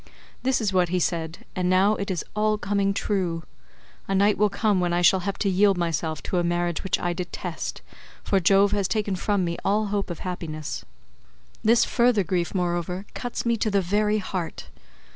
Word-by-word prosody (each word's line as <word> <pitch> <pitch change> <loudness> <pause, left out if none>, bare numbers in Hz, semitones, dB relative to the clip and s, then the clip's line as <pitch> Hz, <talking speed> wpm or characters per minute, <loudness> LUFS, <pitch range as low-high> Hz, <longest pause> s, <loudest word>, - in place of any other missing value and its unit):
This 260 0 +1
is 210 -4 -1
what 180 -2 +3
he 180 - 0
said 165 -1 -2
and 180 -1 0
now 190 +3 +4
it 200 -1 -3
is 180 -4 -2
all 215 0 +2
coming 200 -1 0
true. 185 -5 -1 0.6
A 195 - 0
night 200 +2 +4
will 210 0 +3
come 200 -1 +1
when 175 -1 0
I 175 0 +1
shall 190 +1 +6
have 195 +2 -3
to 205 - -1
yield 195 0 +4
myself 160 -2 -2
to 180 - -1
a - - +1
marriage 175 -1 -1
which 190 - 0
I 175 0 -1
detest, 175 -1 -5 0.4
for 195 - +2
Jove 195 +3 +4
has 200 -2 +1
taken 210 -2 -1
from 195 0 0
me 170 0 -2
all 210 +2 +2
hope 200 -2 -1
of 175 - -6
happiness. 155 -5 -5 0.8
This 230 +2 +5
further 240 -4 +3
grief, 180 0 -1
moreover, 180 +1 -1
cuts 245 -1 -4
me 235 -1 +2
to 215 - 0
the 200 -1 +2
very 210 +3 +1
heart. 185 -4 -5
190 Hz, 195 wpm, -25 LUFS, 175-205 Hz, 0.8 s, shall